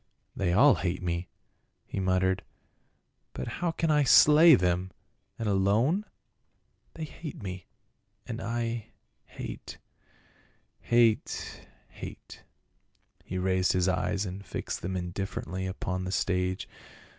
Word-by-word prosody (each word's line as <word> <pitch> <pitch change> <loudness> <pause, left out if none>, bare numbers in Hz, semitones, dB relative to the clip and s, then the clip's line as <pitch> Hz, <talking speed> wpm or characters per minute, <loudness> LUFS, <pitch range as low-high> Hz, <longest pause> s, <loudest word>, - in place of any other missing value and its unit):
" - - -45
They 95 -3 0
all 130 +10 +6
hate 90 0 -2
me," 85 -1 -2 0.6
he - - -5
muttered, 95 0 +1 0.5
" - - -47
but 65 - -4
how 175 - -2
can 165 0 0
I 150 -1 +4
slay 150 +5 +8
them, 90 -2 0 0.5
and 115 - -3
alone? 105 - +2 0.9
They 160 - -5
hate 155 -5 -8
me; 90 -2 -6 0.6
and 115 -1 -5
I 115 -1 -2 0.2
— - - -47
hate, - - -7 1.0
hate, 120 -2 +1 0.2
hate." - - -10 0.8
He 95 - -5
raised 95 0 +2
his 90 0 +2
eyes 95 +2 0
and 95 +1 -6
fixed - - -5
them 95 +1 -3
indifferently 95 0 -4
upon 95 -1 -3
the 95 - -3
stage. 95 -1 0
95 Hz, 125 wpm, -29 LUFS, 90-120 Hz, 1.0 s, slay